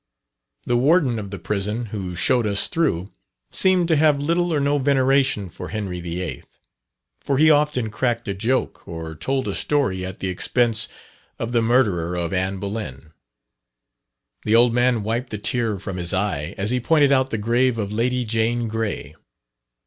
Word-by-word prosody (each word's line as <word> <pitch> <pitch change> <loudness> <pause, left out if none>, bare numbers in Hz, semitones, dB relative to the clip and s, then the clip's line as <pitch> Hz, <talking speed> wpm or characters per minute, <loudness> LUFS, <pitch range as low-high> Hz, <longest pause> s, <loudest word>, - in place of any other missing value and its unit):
The 120 - +1
warden 135 -3 +3
of 100 -2 -6
the 100 - -6
prison 105 +6 -2
who 95 -4 -4
showed 110 +6 +2
us 100 -1 +1
through, 120 - 0 0.4
seemed 185 -2 +3
to 160 - +4
have 150 -1 +4
little 170 +4 0
or 150 - +1
no 145 +1 +1
veneration 135 -5 +2
for 85 - -8
Henry 95 -5 -4
VIII.; 85 0 -4 0.8
for 140 - -1
he 155 +2 +6
often 145 -7 +1
cracked 120 +1 -1
a 100 - -1
joke, 115 +7 -2
or 80 -1 -6
told 130 - -2
a - - -1
story 130 -11 0
at 95 +1 -6
the 95 - -3
expense 110 +4 +1 0.5
of 115 - -4
the 120 -1 +2
murderer 105 -8 +2
of 85 0 -2
Anne 95 +1 -1
Boleyn. 95 -8 -6 1.3
The 110 - +2
old 120 0 +5
man 120 -2 +2
wiped 115 +4 -2
the 105 - -4
tear 115 0 0
from 95 -1 -6
his 85 +1 -2
eye, 85 -6 -2
as 100 +3 -1
he 125 - +1
pointed 145 +2 +3
out 130 -1 +3
the 110 - -2
grave 120 +3 +1
of 105 -2 -3
Lady 125 +3 0
Jane 115 +1 0
Grey. 110 -2 -3
115 Hz, 170 wpm, -22 LUFS, 95-130 Hz, 1.3 s, he